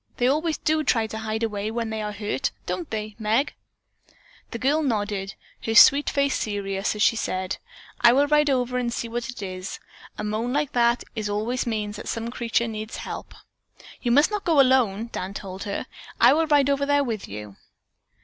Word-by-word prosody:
They 245 - +2
always 310 +4 +1
do 310 0 +1
try 230 -5 +2
to 220 0 -6
hide 220 +1 -3
away 210 -1 -2
when 225 0 -3
they 220 0 -3
are 210 0 -3
hurt, 210 +6 -2 0.2
don't 340 -4 -4
they, 215 -1 -4
Meg?" 225 +6 +1 1.0
The - - -5
girl 280 +6 +2
nodded, 205 -7 -2 0.3
her 225 - -1
sweet 280 +4 +8
face 280 -1 +1
serious 200 -1 -2
as 210 - +1
she - - +4
said: 185 -4 -2 0.4
"I 235 - +8
will 280 +3 +4
ride 300 0 +3
over 250 -1 +1
and 240 -1 -1
see 235 - -3
what 235 +1 -4
it 245 -5 -7
is. 185 0 -6 0.4
A - - -4
moan 215 +3 -2
like 290 0 0
that 235 0 +2 0.3
always 225 +5 -1
means 210 -2 -2
that - - -8
some 230 +1 -3
creature 235 -1 0
needs 215 0 -5
help." - - -7 0.7
"You 245 - -1
must 290 - +5
not 420 -1 -2
go 320 -4 +3
alone," 240 -5 +3
Dan 190 +2 -5
told 190 -1 -6
her. 200 - -3 0.3
"I 240 +3 +7
will 320 +2 +2
ride 285 -2 +4
over 280 0 0
there 285 0 +3
with 225 -6 -4
you." 105 -1 -8
230 Hz, 195 wpm, -24 LUFS, 210-275 Hz, 1.0 s, sweet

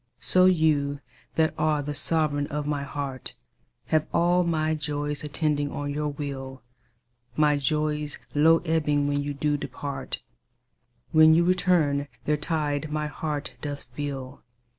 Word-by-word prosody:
So 185 0 +4
you 155 -5 +3 0.4
that 160 -1 +2
are 150 -1 +1
the 145 +1 -3
sovereign 145 -1 +1
of 150 0 -3
my 145 -1 -1
heart 140 -2 -4 0.5
Have 155 0 +1
all 175 +1 +3
my 160 -2 +1
joys 145 -1 -2
attending 150 -1 0
on 145 0 -3
your 150 +1 -1
will; 135 -3 -6 0.7
My 150 -1 +4
joys 150 +1 -1 0.2
low 160 +3 +5
ebbing 150 -3 +1
when 145 0 0
you 145 0 -4
do 145 +1 0
depart, 140 0 -5 0.9
When 155 0 +7
you 170 - +4
return 170 -6 +2 0.2
their 150 - +2
tide 150 -1 -1
my 150 0 -1
heart 150 0 -4
doth 145 -1 -5
fill. 135 +1 -6
150 Hz, 140 wpm, -26 LUFS, 145-155 Hz, 0.9 s, When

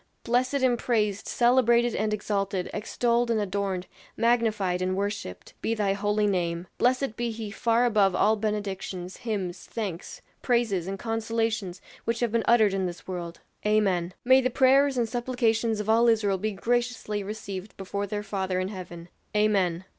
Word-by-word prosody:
"Blessed 250 +3 +1
and 245 -2 +3
praised, 210 -4 0
celebrated 240 -1 +3
and 215 0 0
exalted, 200 -3 -2
extolled 235 +2 0
and 230 -2 +2
adorned, 195 -2 -2 0.3
magnified 215 -6 +1
and 185 +1 0
worshipped, 200 - -4
be 230 - 0
thy 205 -3 +1
holy 205 +1 0
name; 175 -3 -1
blessed 255 -1 +2
be 240 +1 -2
he 220 -2 -5
far 230 +2 +2
above 205 -5 +3
all 215 +1 +4
benedictions, 200 -4 -4
hymns, 190 -6 -4
thanks, 195 -7 -5 0.2
praises, 225 -8 +1
and 195 0 -3
consolations 225 -3 -2 0.2
which 230 0 -1
have 240 -2 +1
been 230 0 +2
uttered 220 -4 +5
in 190 -1 0
this 175 -1 -8
world." 175 -2 -6 0.2
"Amen!" 190 -5 +1
"May 260 +1 +6
the 255 - +1
prayers 270 +2 +4
and 235 -2 +1
supplications 230 -2 0
of 210 - -4
all 230 +2 +4
Israel 210 -4 +2
be 215 +3 -1
graciously 240 -1 -1
received 200 -1 -7
before 200 +1 -3
their 205 +1 -3
Father 190 -3 -2
in 185 +1 -2
heaven." 175 -4 -8 0.3
"Amen." 190 -4 +2
210 Hz, 160 wpm, -27 LUFS, 190-235 Hz, 0.3 s, May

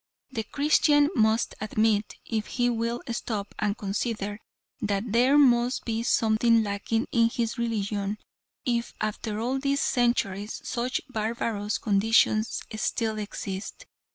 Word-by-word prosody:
The 235 -4 -2
Christian 290 +2 +3
must 220 -3 +2
admit, 215 0 +1
if 220 -2 -2
he 245 -1 +1
will 230 +1 -2
stop 215 -3 -3
and 210 -1 0
consider, 205 0 -3 0.4
that 205 -1 0
there 250 +5 +4
must 245 -3 +4
be 225 -1 -1
something 230 0 +3
lacking 210 +3 -1
in 230 -1 +4
his 235 0 -2
religion, 210 -3 -1 0.5
if 235 -2 -1
after 215 0 -3
all 255 +4 -1
these 280 +1 0
centuries, 215 -4 0
such 245 +2 -1
barbarous 220 -3 -2
conditions 215 +1 +2
still 220 0 -1
exist. 200 -1 -6
225 Hz, 125 wpm, -27 LUFS, 210-240 Hz, 0.5 s, there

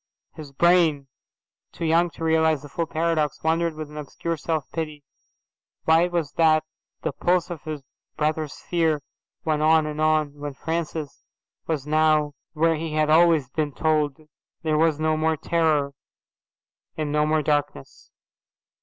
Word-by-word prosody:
His 150 -3 -10
brain, 160 -3 +3 0.6
too 170 - -5
young 165 +2 +3
to - - -7
realize 160 -2 +2
the 145 - -10
full 165 +3 -2
paradox, 160 -2 -1
wondered 165 0 +1
with 155 -1 -6
an 150 - -10
obscure 160 +3 -4
self 160 -1 -2
pity 155 -3 -5 0.8
why 165 +2 +5
it 180 - -5
was 165 -5 -1
that 155 -1 +4 0.4
the - - 0
pulse 180 0 0
of 165 -4 -6
his 155 -3 -5 0.3
brother's 155 -1 -1
fear 160 -4 0 0.4
went 155 -1 +1
on 155 0 +4
and 150 0 -4
on, 155 -2 +1
when 145 -1 -5
Francis 160 -1 -4 0.4
was 150 -4 -2
now 155 -1 +2 0.2
where 165 0 +2
he 160 0 -4
had 155 0 +2
always 160 -4 +5
been 150 0 -2
told 155 -3 +1 0.5
there 155 -1 +1
was 155 -1 +2
no 155 0 +1
more 160 0 +1
terror 155 -4 +1 1.1
and 155 -2 -2
no 150 0 +2
more 155 0 +1
darkness. 145 -1 -2
155 Hz, 155 wpm, -24 LUFS, 150-165 Hz, 1.1 s, why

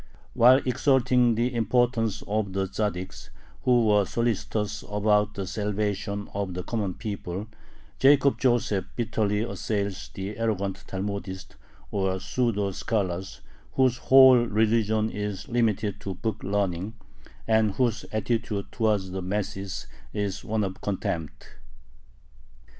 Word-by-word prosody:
While 130 +3 +6
exalting 125 -2 +3
the 120 +3 0
importance 115 -1 +1
of 105 -2 -1
the 95 0 0
Tzaddiks, 95 -1 -4 0.4
who 120 -2 +4
were 105 -1 +4
solicitous 105 -1 -2
about 105 0 +2
the 100 - -3
salvation 105 0 -2
of 100 -3 -3
the 90 - -3
common 100 -2 -2
people, 100 -3 -5 0.5
Jacob 140 0 +5
Joseph 120 -7 +1
bitterly 105 -3 0
assails 100 -4 -3
the 100 +3 -5
arrogant 100 -4 -2
Talmudists, 95 -1 -5 0.4
or 95 -2 0
"pseudo 105 -3 0
scholars," 95 -2 -2 0.3
whose 130 -2 +3
whole 130 -1 +7
religion 110 -1 +1
is 105 -2 -4
limited 110 -4 0
to 95 -2 -5
book 105 +4 -3
learning, 100 +1 -1 0.5
and 110 -2 +3
whose 120 -3 +1
attitude 110 -1 -2
towards 105 -5 0
the 95 0 -3
masses 95 0 -3 0.3
is 100 -2 -2
one 110 0 -1
of 95 -1 -4
contempt. 85 -5 -4
105 Hz, 120 wpm, -26 LUFS, 95-115 Hz, 0.5 s, whole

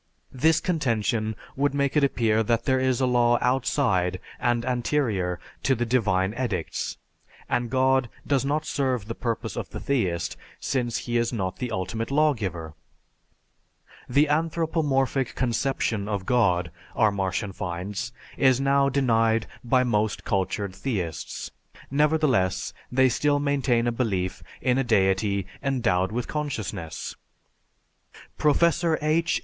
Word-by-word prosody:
This 160 +5 +3
contention 115 - 0 0.2
would 140 +1 +1
make 140 0 0
it 150 - +4
appear 115 -5 +2
that 115 +1 0
there 130 -2 +2
is 130 -1 +1
a - - +4
law 120 -1 +3
outside 95 -8 +1 0.2
and 120 -1 +1
anterior 120 -8 0 0.2
to 135 - +2
the 120 0 -1
divine 105 -5 +1
edicts, 115 -9 -3 0.5
and 120 -1 0
God 130 0 +2 0.2
does 140 -2 +1
not 150 +3 0
serve 130 -7 -1
the 115 - -3
purpose 115 -1 -3
of - - -4
the - - -6
theist 95 -12 -1 0.2
since 120 -3 -1
he 120 0 0
is 115 0 +1
not 95 -6 -2
the 125 - -3
ultimate 110 +2 -3
lawgiver. 105 - 0 1.4
The 140 +5 +4
anthropomorphic 150 -4 0
conception 120 -4 0
of 100 -3 -2
God, 90 -9 +2 0.2
our 110 -3 +4
Martian 95 +1 -2
finds, 95 +6 -4 0.3
is 130 -2 +4
now 140 0 +3
denied 115 -5 +2 0.2
by 125 +1 +3
most 110 -3 0
cultured 100 0 -1
theists; 95 -8 -4 0.4
nevertheless, 140 -10 +2 0.2
they 130 +1 +4
still 145 +3 +2
maintain 140 -4 +1
a 120 - +2
belief 95 -7 -1 0.2
in 125 0 +2
a - - +2
deity 100 -3 +2 0.2
endowed 115 -9 +1
with 120 +2 -2
consciousness. 110 - -4 1.2
Professor 170 +2 +3
H. 155 +2 +1
120 Hz, 130 wpm, -25 LUFS, 105-135 Hz, 1.4 s, it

